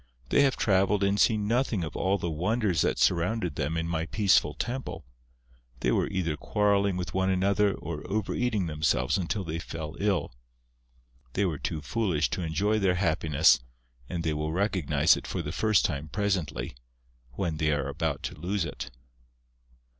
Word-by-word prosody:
They -, -, +4 dB
have 135 Hz, -2 st, +3 dB
travelled 100 Hz, 0 st, +2 dB
and 100 Hz, +1 st, +2 dB
seen 105 Hz, -2 st, +3 dB
nothing 115 Hz, -4 st, +1 dB
of 80 Hz, -, -6 dB
all 95 Hz, +1 st, +1 dB
the 85 Hz, -, -3 dB
wonders 90 Hz, +1 st, 0 dB
that -, -, +1 dB
surrounded 90 Hz, +1 st, +1 dB
them 75 Hz, +3 st, -1 dB
in 80 Hz, 0 st, -1 dB
my 80 Hz, -1 st, -2 dB
peaceful 95 Hz, -7 st, +3 dB
temple; 120 Hz, -, -4 dB, 0.8 s
they -, -, +2 dB
were -, -, +2 dB
either 85 Hz, -5 st, -1 dB
quarrelling 100 Hz, +3 st, +1 dB
with 90 Hz, 0 st, -4 dB
one 95 Hz, 0 st, +1 dB
another 100 Hz, +2 st, +2 dB
or 75 Hz, -1 st, -6 dB
over 105 Hz, -1 st, -1 dB
eating 110 Hz, -6 st, 0 dB
themselves 75 Hz, -1 st, +1 dB
until 95 Hz, +3 st, -2 dB
they 80 Hz, -1 st, -4 dB
fell 80 Hz, -2 st, -6 dB
ill. 100 Hz, -9 st, 0 dB, 1.0 s
They 100 Hz, -, +1 dB
were 80 Hz, -6 st, -2 dB
too 75 Hz, -, -3 dB
foolish 85 Hz, -, 0 dB
to -, -, -2 dB
enjoy 95 Hz, +7 st, +1 dB
their 95 Hz, -3 st, +2 dB
happiness 80 Hz, -4 st, +3 dB, 0.5 s
and 85 Hz, -2 st, -3 dB
they 80 Hz, -1 st, 0 dB
will 75 Hz, +1 st, -2 dB
recognize 95 Hz, -3 st, +2 dB
it -, -, -7 dB
for 90 Hz, -, -3 dB
the 75 Hz, -, -4 dB
first 110 Hz, +3 st, +2 dB
time 70 Hz, +2 st, -2 dB
presently, 90 Hz, -, -2 dB, 0.6 s
when 80 Hz, +3 st, -2 dB
they 75 Hz, 0 st, +1 dB
are 75 Hz, -2 st, 0 dB
about 75 Hz, 0 st, -2 dB
to -, -, -4 dB
lose 90 Hz, +2 st, -1 dB
it...." -, -, -6 dB
90 Hz, 170 wpm, -28 LUFS, 80-100 Hz, 1.0 s, They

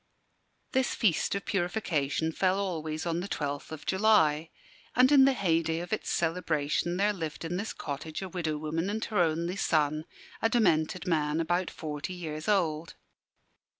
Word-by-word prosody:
This 260 Hz, -1 st, +1 dB
feast 200 Hz, -2 st, +2 dB
of 200 Hz, -, -4 dB
purification 165 Hz, -6 st, 0 dB
fell 185 Hz, +3 st, +1 dB
always 160 Hz, -5 st, -3 dB
on 170 Hz, 0 st, 0 dB
the 180 Hz, -, -4 dB
12th 145 Hz, -6 st, -3 dB
of 155 Hz, -1 st, -8 dB
July; 180 Hz, -6 st, +3 dB, 0.5 s
and 255 Hz, +3 st, +6 dB
in 275 Hz, -2 st, +8 dB
the 275 Hz, -, +4 dB
heyday 165 Hz, -7 st, +1 dB
of 175 Hz, +4 st, -4 dB
its 215 Hz, -, -2 dB
celebration 165 Hz, 0 st, 0 dB
there 205 Hz, +2 st, +2 dB
lived 165 Hz, -4 st, -5 dB
in 175 Hz, +2 st, -2 dB
this 205 Hz, +4 st, -3 dB
cottage 155 Hz, +4 st, -5 dB
a -, -, -4 dB
widow 165 Hz, -4 st, -2 dB
woman 160 Hz, +4 st, -2 dB
and 220 Hz, +2 st, -2 dB
her 210 Hz, -4 st, -1 dB
only 170 Hz, +2 st, +1 dB
son, 155 Hz, -3 st, +1 dB, 0.4 s
a 225 Hz, -, +3 dB
demented 180 Hz, -7 st, +2 dB
man 155 Hz, -3 st, +1 dB
about 175 Hz, +2 st, 0 dB
forty 150 Hz, +3 st, -5 dB
years 155 Hz, -3 st, -6 dB
old. 165 Hz, -6 st, 0 dB
170 Hz, 160 wpm, -29 LUFS, 155-195 Hz, 0.5 s, in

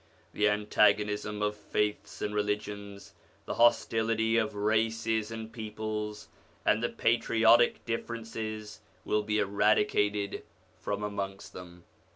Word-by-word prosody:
The 105 Hz, 0 st, +3 dB
antagonism 105 Hz, 0 st, +1 dB
of 105 Hz, 0 st, 0 dB
faiths 105 Hz, 0 st, -2 dB
and 105 Hz, -, -2 dB
religions, 105 Hz, -1 st, -3 dB, 0.3 s
the -, -, -3 dB
hostility 115 Hz, -1 st, +2 dB
of 110 Hz, -2 st, +1 dB
races 110 Hz, +1 st, 0 dB
and 110 Hz, 0 st, -7 dB
peoples, 105 Hz, -1 st, -5 dB, 0.4 s
and 110 Hz, -, +3 dB
the 120 Hz, -, 0 dB
patriotic 115 Hz, 0 st, +3 dB
differences, 110 Hz, -2 st, -5 dB, 0.3 s
will 105 Hz, -, +1 dB
be 105 Hz, 0 st, -1 dB
eradicated 105 Hz, 0 st, +1 dB, 0.4 s
from 100 Hz, 0 st, -3 dB
amongst 100 Hz, -1 st, -5 dB
them. 90 Hz, -1 st, -11 dB
105 Hz, 110 wpm, -30 LUFS, 105-110 Hz, 0.4 s, The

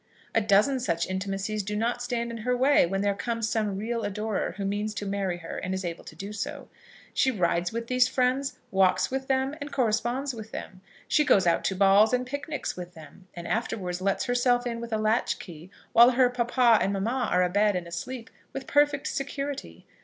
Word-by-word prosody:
A 225 Hz, -, +3 dB
dozen 215 Hz, +6 st, +3 dB
such 170 Hz, -8 st, 0 dB
intimacies 195 Hz, +2 st, -2 dB
do 210 Hz, +2 st, -4 dB
not 235 Hz, +3 st, -1 dB
stand 235 Hz, -1 st, -2 dB
in 230 Hz, -, -5 dB
her 250 Hz, +3 st, -1 dB
way 265 Hz, -6 st, +4 dB
when 195 Hz, +2 st, -1 dB
there 200 Hz, 0 st, +2 dB
comes 230 Hz, +2 st, -2 dB
some 215 Hz, -3 st, -1 dB
real 230 Hz, +3 st, -2 dB
adorer 210 Hz, 0 st, -2 dB
who 200 Hz, -, -3 dB
means 205 Hz, +2 st, -2 dB
to 205 Hz, -, -4 dB
marry 195 Hz, -3 st, -2 dB
her 165 Hz, -1 st, -6 dB
and 185 Hz, +1 st, -3 dB
is 190 Hz, -1 st, -4 dB
able 170 Hz, -1 st, -5 dB
to -, -, -11 dB
do 200 Hz, +2 st, -7 dB
so. 285 Hz, +8 st, -5 dB, 0.4 s
She 265 Hz, -, +3 dB
rides 175 Hz, -6 st, 0 dB
with 230 Hz, +1 st, -3 dB
these 250 Hz, +1 st, +3 dB
friends, 260 Hz, +1 st, 0 dB
walks 190 Hz, +3 st, +3 dB
with 265 Hz, 0 st, -3 dB
them, 265 Hz, +1 st, +1 dB
and 290 Hz, +1 st, -6 dB
corresponds 250 Hz, +3 st, 0 dB
with 220 Hz, -2 st, -8 dB
them. 185 Hz, 0 st, -8 dB, 0.3 s
She 300 Hz, -, +3 dB
goes 200 Hz, -9 st, +4 dB
out 170 Hz, -, +2 dB
to 190 Hz, -, 0 dB
balls 200 Hz, +4 st, +5 dB
and 250 Hz, 0 st, +1 dB
picnics 285 Hz, +3 st, -4 dB
with 180 Hz, 0 st, -8 dB
them, 160 Hz, +4 st, -14 dB
and 170 Hz, -1 st, -7 dB
afterwards 185 Hz, -6 st, -2 dB
lets 195 Hz, 0 st, 0 dB
herself 245 Hz, 0 st, +2 dB
in 235 Hz, -1 st, -3 dB
with 235 Hz, 0 st, -7 dB
a 220 Hz, -, +1 dB
latchkey, 205 Hz, -6 st, -1 dB, 0.2 s
while 235 Hz, +2 st, +8 dB
her 250 Hz, 0 st, +3 dB
papa 240 Hz, -2 st, +3 dB
and 195 Hz, -, +1 dB
mamma 230 Hz, +6 st, -1 dB
are 180 Hz, 0 st, +4 dB
a 180 Hz, -, +1 dB
bed 205 Hz, +1 st, +3 dB
and 180 Hz, -1 st, -2 dB
asleep, 225 Hz, +8 st, -6 dB, 0.2 s
with 270 Hz, -1 st, -5 dB
perfect 290 Hz, -1 st, +2 dB
security. 280 Hz, 0 st, -4 dB
220 Hz, 205 wpm, -27 LUFS, 195-250 Hz, 0.4 s, while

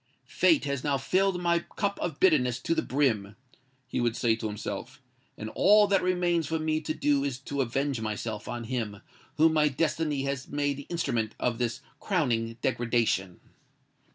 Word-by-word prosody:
"Fate 320 Hz, -, +3 dB
has 140 Hz, -2 st, -2 dB
now 145 Hz, -2 st, +1 dB
filled 185 Hz, +7 st, +1 dB
my 170 Hz, -1 st, +2 dB
cup 200 Hz, +3 st, -3 dB
of 170 Hz, -, -3 dB
bitterness 130 Hz, -10 st, +3 dB
to 130 Hz, -, -1 dB
the -, -, +1 dB
brim," 115 Hz, -8 st, 0 dB, 0.5 s
he -, -, -2 dB
would 120 Hz, -1 st, +1 dB
say 115 Hz, -3 st, +2 dB
to 110 Hz, -1 st, -4 dB
himself; 115 Hz, +5 st, -6 dB, 0.4 s
"and 110 Hz, +1 st, -6 dB
all 210 Hz, +2 st, +6 dB
that 195 Hz, -2 st, +2 dB
remains 175 Hz, -3 st, +1 dB
for 160 Hz, -, -1 dB
me 155 Hz, 0 st, 0 dB
to 155 Hz, 0 st, -3 dB
do 145 Hz, -1 st, +2 dB
is 140 Hz, -3 st, -2 dB
to 140 Hz, +1 st, -3 dB
avenge 135 Hz, 0 st, -1 dB
myself 110 Hz, 0 st, -4 dB
on 120 Hz, -1 st, -4 dB
him 110 Hz, -4 st, -4 dB, 0.3 s
whom 160 Hz, +1 st, +5 dB
my 155 Hz, -1 st, +4 dB
destiny 150 Hz, 0 st, 0 dB
has 140 Hz, -1 st, -3 dB
made 145 Hz, -1 st, -1 dB
the 145 Hz, -, -9 dB
instrument 120 Hz, -10 st, -1 dB
of 120 Hz, -1 st, -1 dB
this 120 Hz, +1 st, -2 dB, 0.2 s
crowning 115 Hz, -, 0 dB
degradation." 115 Hz, -7 st, 0 dB
140 Hz, 175 wpm, -28 LUFS, 115-160 Hz, 0.5 s, all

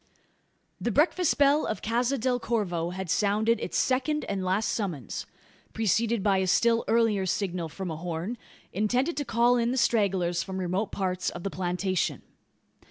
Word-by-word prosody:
The -, -, -1 dB
breakfast 310 Hz, -, +2 dB
bell 285 Hz, +2 st, +4 dB
of 215 Hz, -, -4 dB
Casa 240 Hz, +4 st, +1 dB
del 250 Hz, +1 st, 0 dB
Corvo 185 Hz, -8 st, -1 dB
had 185 Hz, +1 st, -5 dB
sounded 215 Hz, +5 st, +2 dB
its -, -, -3 dB
second 270 Hz, +4 st, +1 dB
and 195 Hz, -2 st, -3 dB
last 190 Hz, +4 st, 0 dB
summons 170 Hz, -, -3 dB, 0.5 s
preceded 225 Hz, 0 st, +1 dB
by 195 Hz, -2 st, +3 dB
a 190 Hz, -, 0 dB
still 230 Hz, +5 st, +3 dB
earlier 220 Hz, -4 st, +2 dB
signal 180 Hz, -3 st, -2 dB
from 185 Hz, +2 st, -5 dB
a 155 Hz, -, -5 dB
horn, 175 Hz, +7 st, -4 dB, 0.3 s
intended 245 Hz, -, +1 dB
to 290 Hz, -, -1 dB
call 240 Hz, +1 st, +3 dB
in 235 Hz, 0 st, +1 dB
the 255 Hz, -, -1 dB
stragglers 190 Hz, -8 st, +1 dB
from 190 Hz, +1 st, -5 dB
remote 185 Hz, +3 st, -1 dB
parts 185 Hz, -2 st, -1 dB
of 175 Hz, -, -8 dB
the 195 Hz, -, -3 dB
plantation. 180 Hz, 0 st, -1 dB
205 Hz, 165 wpm, -27 LUFS, 185-235 Hz, 0.5 s, bell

